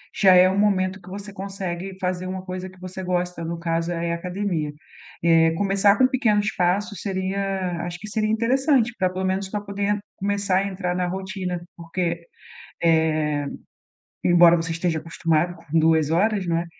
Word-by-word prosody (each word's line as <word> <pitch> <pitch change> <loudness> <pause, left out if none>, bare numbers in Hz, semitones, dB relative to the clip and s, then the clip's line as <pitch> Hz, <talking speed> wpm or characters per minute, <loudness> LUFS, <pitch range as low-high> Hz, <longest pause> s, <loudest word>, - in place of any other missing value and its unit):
já 190 -3 +6
é 180 0 +7
o 190 - 0
momento 190 -2 +1
que 185 - -13
você 200 +1 -8
consegue 190 -1 -5
fazer 185 0 -2
uma 185 0 -5
coisa 185 0 -5
que 185 0 -18
você 185 +1 -7
gosta, 180 -1 -2
no 170 +1 -3
caso 165 0 -1
aí 170 0 -2
é 170 - 0
academia. 175 -3 -2 0.5
Eh, 165 -1 +5
começar 200 +1 +3
com 260 - +5
pequenos 215 -5 +1
passos 190 +2 0
seria 190 -2 -2
acho 175 0 -5
que 210 - -8
seria 215 0 -1
interessante 240 +2 +2
para 185 -1 +2
pelo 185 +1 -3
menos 190 +1 -1
pra 210 +1 -2
poder 205 0 -1 0.2
começar 200 -1 0
a 200 - -1
entrar 180 -2 -3
na 180 0 0
rotina. 190 -1 -4 0.2
Porque, 170 0 -3 0.6
eh, 155 -3 +2 0.8
embora 175 -1 +7
você 165 0 -2
esteja 165 0 -1
acostumado 165 +1 0
com 160 +3 -2
2 160 -1 +3
horas, 200 +4 +2
não 165 -1 +1
é? 170 - -3
185 Hz, 175 wpm, -23 LUFS, 170-200 Hz, 0.8 s, é